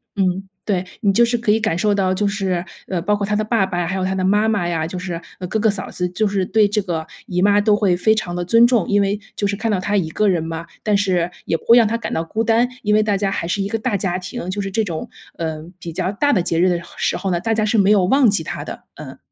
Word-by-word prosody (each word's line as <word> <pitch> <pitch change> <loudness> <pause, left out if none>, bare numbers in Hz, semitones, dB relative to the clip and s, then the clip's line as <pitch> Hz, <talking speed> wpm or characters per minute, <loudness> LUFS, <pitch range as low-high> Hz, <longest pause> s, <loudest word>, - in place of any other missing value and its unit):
嗯， 190 -1 0 0.2
对， 185 -3 -1 0.2
你 200 -4 +3
就 235 +5 +4
是 240 0 0
可 225 -2 +1
以 220 - +3
感 220 -6 0
受 205 +4 +1
到 190 -2 +1
就 205 +2 0
是， 190 -3 -1 0.2
呃， 180 -3 -2
包 205 +4 +1
括 205 -1 -2
他 210 +1 -1
的 215 - +1
爸 215 -2 +1
爸， 175 -2 -2
还 190 - -2
有 190 -1 -1
他 190 - -1
的 190 -1 -1
妈 205 +3 +3
妈 205 -6 0
呀， 165 -2 -1
就 180 +3 -5
是， 180 -2 -4 0.2
呃， 180 - -5
哥 220 - -1
哥 215 0 +3
嫂 200 -2 -6
子， 180 - -2
就 195 +5 0
是 195 -2 0
对 215 +2 +3
这 210 0 -1
个 165 -4 -3 0.2
姨 180 -6 -1
妈 205 +1 +4
都 210 0 +3
会 195 -4 +2
非 220 +4 +3
常 185 -5 -3
的 175 0 -2
尊 230 +6 +6
重， 240 -7 +1
因 205 0 +3
为 200 +1 0 0.2
就 205 - 0
是 200 - -1
看 220 +2 -2
到 200 - +1
她 205 +3 0
一 170 -5 0
个 210 +5 +1
人 175 -4 +1
嘛， 165 0 -5 0.2
但 210 -1 +2
是 180 -3 +1
也 165 - 0
不 - - -21
会 235 - +7
让 230 -2 +5
她 230 +2 -1
感 230 - -5
到 160 - 0
孤 220 +7 -2
单， 230 +2 +2
因 210 -1 +2
为 215 - +5
大 210 -2 +1
家 195 0 -1
还 170 - -3
是 195 +3 -1
一 - - -2
个 225 +2 -2
大 215 -2 0
家 185 -2 -1
庭， 185 +1 -6
就 205 +2 -3
是 195 - -3
这 220 +3 0
种， 170 -6 -5 0.3
呃， 160 -1 -4
比 170 - -7
较 175 +3 -2
大 285 +8 +1
的 185 -9 +2
节 165 -1 0
日 185 +2 +4
的 175 -1 0 0.2
时 - - 0
候 190 +1 -2
呢， 175 - +1
大 225 +2 0
家 215 -1 +1
是 215 +1 +2
没 195 0 +4
有 205 -3 +4
忘 265 +4 +4
记 200 -5 0
她 - - -5
的， - - -8
嗯。 - - -9
200 Hz, 325 characters per minute, -20 LUFS, 180-215 Hz, 0.3 s, 会